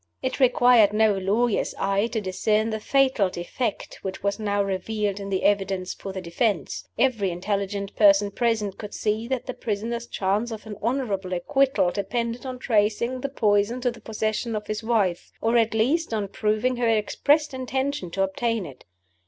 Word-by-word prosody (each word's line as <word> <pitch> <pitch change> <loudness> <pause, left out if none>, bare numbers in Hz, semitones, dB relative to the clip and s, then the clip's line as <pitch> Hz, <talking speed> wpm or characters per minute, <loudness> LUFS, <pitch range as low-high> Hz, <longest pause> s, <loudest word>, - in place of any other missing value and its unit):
It 260 - -2
required 245 -4 +5
no 215 -1 +4
lawyer's 205 +4 0
eye 195 +2 +1
to 235 -1 -2
discern 215 +3 0
the 220 - -2
fatal 260 -5 +2
defect 195 +6 -4
which 190 0 -6
was 200 +1 0
now 205 -1 0
revealed 200 +1 -2
in 200 0 -6
the 190 -1 -1
evidence 195 -2 +1
for 195 - -7
the 190 - -5
defense. 190 +4 -1
Every 225 -7 +2
intelligent 200 +2 -3
person 200 -1 +5
present 220 -4 -1
could 210 -1 -7
see 215 +2 -1
that 260 -1 -2
the 255 - -4
prisoner's 235 +2 -3
chance 205 +5 0
of 220 -1 -7
an 215 -1 -7
honorable 210 -6 -1
acquittal 270 +1 +2
depended 235 +6 -3
on 255 -1 -5
tracing 235 +1 +1
the 275 - -2
poison 210 -1 +1
to 245 -1 +1
the 235 - -13
possession 220 +1 -2
of 210 0 -4
his 215 +1 -4
wife 210 -7 0
or 225 +1 +1
at 225 -1 +3
least 260 +4 +1
on 205 -2 -2
proving 215 +5 0
her 240 -1 +1
expressed 285 +7 +2
intention 260 -4 -2
to 195 +3 0
obtain 220 +2 -1
it. 135 -5 -12
215 Hz, 175 wpm, -25 LUFS, 200-240 Hz, -, required